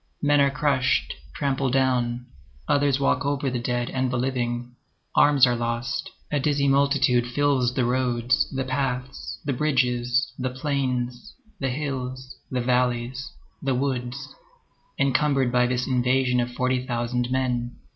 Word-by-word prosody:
Men 145 0 +4
are 140 - +4
crushed, 140 -2 +1 0.2
trampled 135 -2 0
down, 125 -2 +1 0.4
others 140 -2 +2
walk 140 - +1
over 140 -1 -1
the 125 - -2
dead 120 0 -2
and 130 -1 0
the 125 - -1
living. 120 -1 -2 0.4
Arms 145 -3 +6
are 125 -1 +1
lost. 120 0 -2 0.2
A 145 - +1
dizzy 140 0 +1
multitude 135 -3 +3
fills 130 -1 +1
the 125 - +1
roads, 125 0 +1
the 135 0 -2
paths, 130 0 -3
the 140 - 0
bridges, 125 -3 +1
the 130 0 -1
plains, 125 -2 -2 0.2
the 135 - -1
hills, 130 -2 -4
the 125 -1 -1
valleys, 125 +1 0 0.3
the 135 -2 0
woods, 125 -2 -3 0.6
encumbered 140 -1 +2
by 125 0 +3
this 125 0 -1
invasion 125 0 +2
of 120 0 -1
forty 125 +1 0
thousand 120 0 -2
men. 125 -2 -1
130 Hz, 140 wpm, -25 LUFS, 125-135 Hz, 0.6 s, Arms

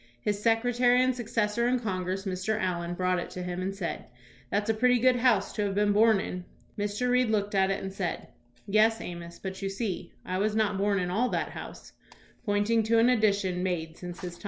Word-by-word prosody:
His 205 +9 -2
secretary 245 +2 +3
and 255 0 +1
successor 230 -1 0
in 250 0 +2
Congress, 190 -3 -3
Mr. 190 +3 -1
Allen, 175 -2 -2
brought 185 0 +1
it - - -5
to 180 - -6
him 180 0 -4
and 195 +1 -3
said, 190 -4 -4 0.2
" 125 +1 -26
That's 205 +1 0
a 225 - +3
pretty 250 +3 +3
good 250 +1 +4
house 235 -5 +2
to 210 - -1
have 195 -1 -2
been 205 0 +3
born 220 0 +5
in." 180 -1 -5 0.3
Mr. 205 +4 -2
Reed 250 -1 +3
looked 205 -1 0
at 190 -1 +3
it 195 +1 -2
and 190 0 -5
said, 190 -3 -4 0.4
"Yes, 220 +2 +3
Amos; 170 -1 -7
but, 190 0 -6
you 195 - -2
see, 195 -3 -4
I 185 +1 -2
was 210 +1 0
not 210 -3 +1
born 200 0 +2
in 180 -1 -2
all 235 +7 +1
that - - -1
house," - - -9 0.5
pointing 205 +3 +2
to 230 +1 +3
an 230 +2 +5
addition 200 -6 +2
made 165 -3 -2
since 175 0 -8
his 175 -1 -6
time. - - -21
205 Hz, 220 wpm, -28 LUFS, 185-225 Hz, 0.5 s, born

